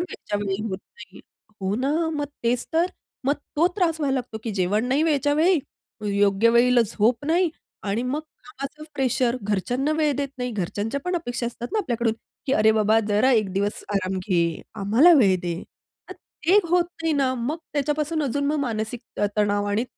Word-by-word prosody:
वेळच्या 350 - -4
वेळी 200 0 -2
होत 190 0 -3 0.2
नाही. 190 0 -12 0.4
हो 190 +1 -1
ना. 270 +4 0 0.2
मग 290 -1 -1 0.2
तेच 235 +1 +1
तर 330 +2 +3 0.4
मग 285 +2 +3 0.2
तो 330 - +5
त्रास 330 -4 +1
व्हायला 275 -2 +1
लागतो, 245 -4 -4
की 230 - -2
जेवण 205 +5 +1
नाही 275 +4 +2
वेळच्या 290 -2 +2
वेळी 340 +3 +4 0.6
योग्य 200 +3 +4
वेळीला 240 +1 +5
झोप 230 +6 +1
नाही 345 +1 +2 0.3
आणि 205 +3 -1
मग 265 +5 -1
कामाचं 305 -1 -10
प्रेशर 255 -2 +1
घरच्यांना 245 +9 0
वेळ 305 -2 +2
देत 280 -1 -1
नाही. 250 0 -2
घरच्यांच्या 210 +6 -2
पण 360 - -1
अपेक्षा 245 -7 -3
असतात 240 0 -5
ना 435 - +1
आपल्याकडून, 235 - 0 0.3
की 265 - +1
अरे, 220 -4 +5
बाबा 220 0 +3
जरा 210 +6 +3
एक 215 -5 +2
दिवस 200 +2 -1
आराम 190 -1 0
घे. 170 -3 0
आम्हाला 225 - +5
वेळ 195 -6 +5
दे. 170 -1 -3 0.5
तर - - -6 0.3
ते 385 +4 +6
होत 350 0 +3 0.2
नाही 325 -1 +1
ना 270 -3 +2
मग 255 +7 -2
त्याच्यापासून 300 +2 0
अजून 280 +1 -1
मानसिक 225 -2 -2 0.4
तणाव 205 -1 +2
आणि 220 +4 +1
245 Hz, 175 wpm, -24 LUFS, 210-290 Hz, 0.6 s, ते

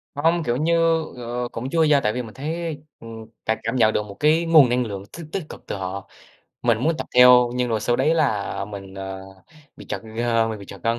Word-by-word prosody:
Hông, 165 +3 +1
kiểu 120 -2 0
như, 165 +3 +1 0.4
ờ, 120 0 -4
cũng 125 +3 -5
chưa 165 +2 +2
nha. 150 -2 +4
Tại 105 0 0
vì 125 - -2
mình 110 -3 -10
thấy, 160 +2 -4 0.2
ừm, 115 -1 -10 0.2
cảm 110 0 +1
cảm 115 +3 -2
nhận 110 -3 +3
được 105 - -1
một 100 -1 -11
cái 160 +3 +3
nguồn 155 -6 +6
năng 125 0 +1
lượng 100 -2 -6
tích 170 - -8
tích 195 - -3
cực - - -11
từ - - -3
họ. 95 0 -6 0.5
Mình 115 -2 +2
muốn 160 +5 0
tập - - -4
theo, 125 -1 +7
nhưng 125 -1 0
rồi 110 -2 -1
sau 120 - +1
đấy 160 - +2
là 110 -11 0
mình, 100 -2 -9
ờ, 95 0 -6 0.6
bị - - -12
trật, - - -3 0.2
ơ, 115 -1 +1
mình 110 -2 -5
bị 100 - -11
trật - - -11
gân. 115 +1 0
120 Hz, 240 wpm, -22 LUFS, 110-150 Hz, 0.6 s, theo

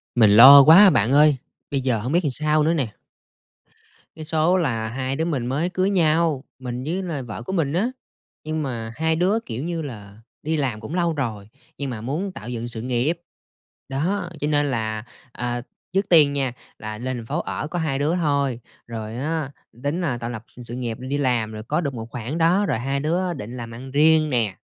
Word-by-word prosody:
Mình 110 -4 +6
lo 135 +5 +11
quá 180 +7 +9
bạn 120 - +2
ơi, 145 0 +5 0.3
bây 140 -1 0
giờ 125 -4 0
hổng 125 +6 -4
biết 175 +2 +2
làm 145 - 0
sao 155 +2 +1
nữa 160 - +2
nè. 130 -10 -2 1.2
Cái 155 - -8
số 160 +4 +2
là 115 -10 -1
hai 130 +2 -3
đứa 160 +3 -1
mình 140 -8 -2
mới 145 +7 0
cưới 185 +1 0
nhau, 160 -5 +2 0.2
mình 125 -1 -5
với 175 +7 -2
là 165 -6 -3
vợ 115 -2 -7
của 190 - -5
mình 155 -6 0
á, 200 +8 +1 0.5
nhưng 155 0 -2
mà 115 -5 -4
hai 160 +1 +1
đứa, 185 +7 +2
kiểu 120 +3 -5
như 170 0 -3
là, 105 -8 -9 0.3
đi 160 +1 0
làm 130 -7 -1
cũng 115 +10 -6
lâu 170 -2 +1
rồi, 110 -8 -4 0.3
nhưng 140 -1 -3
mà 115 -4 -5
muốn 155 - -3
tạo 125 - -9
dựng 120 -1 -4
sự 115 -2 -6
nghiệp. 130 +8 -1 0.7
Đó, 175 +8 -1
cho 145 - 0
nên 145 -1 +2
là, 110 -3 -2 0.3
à, 120 0 -3 0.3
trước 195 +1 0
tiên 150 -5 +7
nha, 135 -3 -1 0.3
là 110 0 -6
lên 130 +2 -4
thành 115 - -7
phố - - -2
ở - - -4
có 175 +3 -3
hai 145 -5 -1
đứa 150 +4 +1
thôi, 140 -7 0 0.3
rồi 110 -1 -6
á, 150 +1 -2 0.3
tính 150 +5 -1
là 140 -8 -1
tạo 115 0 -5
lập 110 -2 -6
s - - -17
sự 120 - -7
nghiệp, 120 -3 -4
đi 130 +3 -3
làm 120 -6 0
rồi 110 0 -7
có 150 +9 -1
được 140 -5 -3
một 115 -1 -7
khoản 120 +7 -4
đó, 175 +5 +3
rồi 195 - 0
hai 135 +3 -1
đứa 175 +5 0
định 125 -4 -7
làm 115 -1 -7
ăn 130 +3 -9
riêng 155 +2 +4
nè. 115 -8 +1
140 Hz, 220 wpm, -23 LUFS, 120-160 Hz, 1.2 s, lo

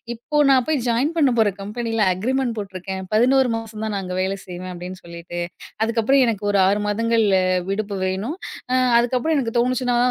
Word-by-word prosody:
இப்போ 240 +6 -4
நா 270 - +6
போய் 310 -3 +2
ஜாயின் 245 +7 +1
பண்ண 285 -5 +4
போற 215 -2 +4
கம்பெனில 225 +2 -3
அக்ரீமெண்ட் 250 +4 -1
போட்ருக்கேன். 190 -1 -5
11 255 +3 +4
மாசம் 220 -1 -8
தான் 215 - -3
நான் 195 - -2
அங்க 180 0 -5
வேல 190 +1 -1
செய்வேன் 180 0 -7
அப்டின்னு 180 +1 -8
சொல்லிட்டு. 170 0 -7 0.5
அதுக்கப்புறம் 230 +4 +2
எனக்கு 210 -3 -2
ஒரு 200 - +2
6 205 +2 +1
மாதங்கள் 230 +2 +1 0.5
விடுப்பு 205 0 -2
வேணும். 195 - -3 0.3
அ - - +1 0.3
அதுக்கப்புறம் 255 +6 +1
எனக்கு 240 -4 -2
தோணுச்சுனா 250 0 +1
225 Hz, 170 wpm, -21 LUFS, 195-245 Hz, 0.5 s, நா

